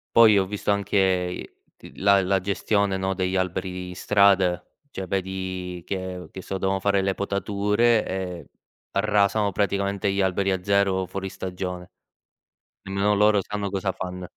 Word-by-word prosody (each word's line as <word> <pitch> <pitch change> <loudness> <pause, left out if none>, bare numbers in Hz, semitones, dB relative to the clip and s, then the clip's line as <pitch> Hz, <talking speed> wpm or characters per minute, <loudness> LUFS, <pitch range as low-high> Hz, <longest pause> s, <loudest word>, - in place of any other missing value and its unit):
Poi 110 -3 +7
ho 95 - +1
visto 105 0 -2
anche 100 0 0
i 90 -2 0 0.3
t - - -13
la 100 0 +4
la 95 +1 +2
gestione, 100 +1 0
no, 95 0 -1
degli 95 0 -1
alberi 90 0 -2
in 90 - -8
strada. 95 -3 +3 0.3
Cioè 95 -7 -6
vedi 95 -2 -4
che 95 -2 -5
che 95 - -8
so, 95 +2 -4
devono 95 +1 0
fare 100 0 +2
le 95 0 0
potature 105 +3 +1
e 90 -2 -5 0.4
arrasano 100 0 +2
praticamente 100 0 0
gli 100 0 0
alberi 95 +1 +1
a 95 -1 -2
zero 100 -2 +2
fuori 95 +1 -5
stagione. 90 -1 -6 0.9
Nemmeno 100 +2 +1
loro 105 0 +4
sanno 105 0 -4
cosa 95 0 -1
fann 90 0 -6
95 Hz, 155 wpm, -24 LUFS, 95-100 Hz, 0.9 s, Poi